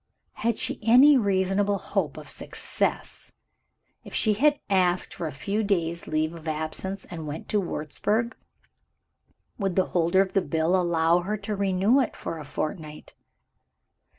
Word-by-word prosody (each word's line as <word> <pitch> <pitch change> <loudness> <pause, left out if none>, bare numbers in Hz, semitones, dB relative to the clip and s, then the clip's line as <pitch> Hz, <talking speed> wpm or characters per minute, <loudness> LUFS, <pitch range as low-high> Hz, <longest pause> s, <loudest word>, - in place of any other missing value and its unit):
Had 230 -1 -1
she - - -2
any 255 +7 +7
reasonable 200 -2 +1
hope 195 - -2
of - - -9
success, - - -3 0.7
if - - -9
she 215 -2 +3 0.3
asked 185 -2 +1
for 165 - -4
a - - -5
few 200 +10 -2
days' 170 -4 -1
leave 155 +1 0
of 165 -1 -10
absence, 160 +5 -3
and 160 -3 -6
went 150 +2 -6
to 210 - +2
Wurzburg? 205 - -2 1.2
Would 195 -3 -1
the 190 - +3
holder 175 +2 +3
of 190 - -9
the 195 - +3
bill 165 0 +1
allow 170 -1 +3
her 205 +5 -2
to 210 -1 -2
renew 200 +5 +2
it 260 - -1
for 165 - -5
a 150 - -8
fortnight? 155 +1 -5
185 Hz, 150 wpm, -26 LUFS, 165-205 Hz, 1.2 s, any